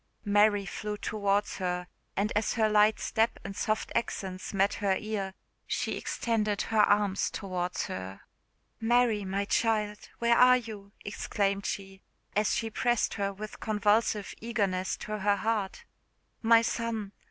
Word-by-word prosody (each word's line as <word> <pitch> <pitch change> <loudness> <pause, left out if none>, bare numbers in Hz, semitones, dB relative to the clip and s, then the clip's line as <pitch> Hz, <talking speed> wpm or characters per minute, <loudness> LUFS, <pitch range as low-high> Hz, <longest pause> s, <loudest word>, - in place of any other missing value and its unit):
Mary 205 0 +4
flew 210 +1 -4
towards 205 -1 0
her; 180 -1 -2 0.3
and 205 +2 +1
as 210 +1 +1
her 220 -2 +3
light 210 0 +4
step 225 +1 +1
and 200 0 -6
soft 215 +3 -1
accents 190 -5 -3
met 195 +1 +2
her 200 -3 +1
ear, 200 -3 -4 0.3
she - - -1
extended 215 -3 -1
her 220 -1 0
arms 205 -2 +3
towards 180 -2 -3
her. 95 +1 -6 0.6
"Mary, 230 -2 +3
my 195 +1 -1
child, 210 -1 0
where 235 0 +3
are 250 +1 +7
you?" 215 -4 -8
exclaimed 200 -1 -1
she, 195 -1 -5 0.3
as 210 +1 +2
she 225 - -1
pressed 240 +1 +1
her 200 0 -1
with 210 +2 -8
convulsive 210 -1 +1
eagerness 200 -5 -1
to 215 0 -5
her 205 +1 +3
heart. 210 -1 -2 0.6
"My 230 0 +6
son! 225 -3 -2
210 Hz, 140 wpm, -29 LUFS, 195-220 Hz, 0.6 s, are